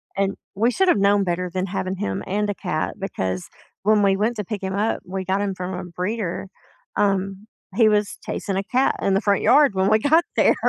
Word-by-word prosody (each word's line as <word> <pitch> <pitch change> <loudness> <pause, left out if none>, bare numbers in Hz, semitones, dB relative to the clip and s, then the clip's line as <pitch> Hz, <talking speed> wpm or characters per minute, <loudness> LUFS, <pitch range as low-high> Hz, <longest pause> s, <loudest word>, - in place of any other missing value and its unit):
and 195 0 0 0.2
we 225 +5 +3
should've 360 - +3
known 200 0 +4
better 180 0 -1
than 185 +1 -1
having 190 0 -3
him 100 - -3
and 205 +2 0
a - - -2
cat, 175 -6 -2
because 95 - -3 0.3
when 210 0 +4
we 195 -1 +4
went 220 +4 0
to 210 - -3
pick 205 0 -4
him 190 0 -3
up- 215 +3 0
we 190 +1 -4
got 190 +2 0
him 200 -2 -2
from 185 0 -5
a 180 +1 -4
breeder- 180 +1 -3 0.5
um, 195 0 0 0.3
he 220 0 +5
was 210 -1 +1
chasing 195 -1 -3
a 195 - -1
cat 255 +6 +1
in 195 - +1
the 195 - +2
front 200 -2 +2
yard 275 +2 +5
when 190 +1 +2
we 215 0 +4
got 315 +7 +4
there. - - +4
195 Hz, 220 wpm, -22 LUFS, 185-210 Hz, 0.5 s, he